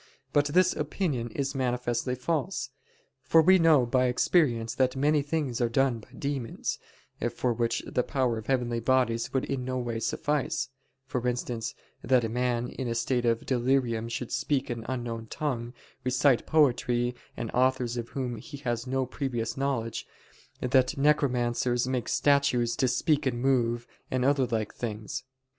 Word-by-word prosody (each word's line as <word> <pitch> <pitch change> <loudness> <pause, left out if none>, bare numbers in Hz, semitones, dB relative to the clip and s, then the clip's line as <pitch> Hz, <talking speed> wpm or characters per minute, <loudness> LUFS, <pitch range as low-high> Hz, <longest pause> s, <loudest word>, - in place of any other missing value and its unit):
But 145 -1 +4
this 175 +5 +3
opinion 150 -5 -2
is 135 +2 -2
manifestly 125 -1 -1
false. 145 +1 -2 0.5
For 130 +5 +4
we 185 +4 +6
know 155 -6 +5
by 130 +1 +2
experience 125 -3 +2
that 130 0 +1
many 145 +2 +3
things 140 -4 -2
are 120 - +2
done 130 -1 +2
by 105 - -16
demons, 140 -5 -3 0.5
for 125 -2 -1
which 115 0 -1
the - - 0
power 125 -4 0
of 110 - -11
heavenly 120 -3 0
bodies 115 -1 +1
would 130 - 0
in 135 -2 -2
no 130 0 -2
way 120 -2 -2
suffice: 140 +2 -1 0.4
for 125 -2 -2
instance, 120 -2 -2 0.3
that 125 0 +3
a 115 - -1
man 120 0 0
in 130 - -5
a 115 - -1
state 120 +1 0
of 115 -1 +1
delirium 120 -3 +1
should 120 0 -4
speak 140 -3 0
an 115 -1 -5
unknown 120 -3 -4
tongue, 120 -5 -3 0.3
recite 130 0 +2
poetry 125 -5 +2 0.2
and 115 -2 -4
authors 125 -1 +1
of 120 -1 -4
whom 125 -3 -3
he 145 +6 -9
has 120 -3 -3
no 130 0 0
previous 120 -3 -3
knowledge; 135 -5 -2 0.5
that 130 +3 +2
necromancers 125 -4 +2
make 130 -2 -1
statues 140 -5 +2
to 130 - +2
speak 140 +3 +1
and 120 -2 -1
move, 120 -2 +1 0.2
and 130 -1 0
other 135 -2 +3
like 110 -3 -2
things. 110 0 -5
125 Hz, 160 wpm, -28 LUFS, 120-135 Hz, 0.5 s, we